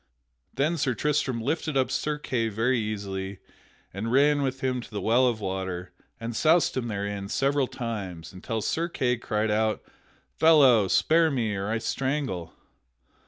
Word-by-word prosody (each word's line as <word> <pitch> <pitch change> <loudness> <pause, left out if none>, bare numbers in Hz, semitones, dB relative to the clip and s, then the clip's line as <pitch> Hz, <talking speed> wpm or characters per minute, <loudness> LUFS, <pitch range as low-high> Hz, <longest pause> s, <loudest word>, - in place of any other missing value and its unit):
Then 150 +6 +1
Sir 130 -4 0
Tristram 135 -5 0
lifted 150 +1 -1
up 130 -1 +1
Sir 150 +2 -1
Kay 120 -6 -1
very 115 +4 +1
easily 100 -3 -4 0.6
and 105 +4 -3
ran 145 +2 +4
with 135 -1 -2
him 130 -1 -1
to - - -12
the 105 - -4
well 120 +5 +3
of 115 -3 0
water 95 -2 -4 0.3
and 115 0 -5
soused 160 +8 +3
him 125 -2 -2
therein 100 -2 -4
several 135 +2 +1
times 95 -10 -6
until 110 +4 -4
Sir 170 +2 -1
Kay 125 -6 0
cried 110 -2 -1
out, 110 0 0 0.5
"Fellow, 135 -10 +5
spare 160 - +3
me 120 -7 -1
or 100 +1 -3
I 115 - 0
strangle!" 130 - -2
115 Hz, 160 wpm, -26 LUFS, 105-135 Hz, 0.6 s, Fellow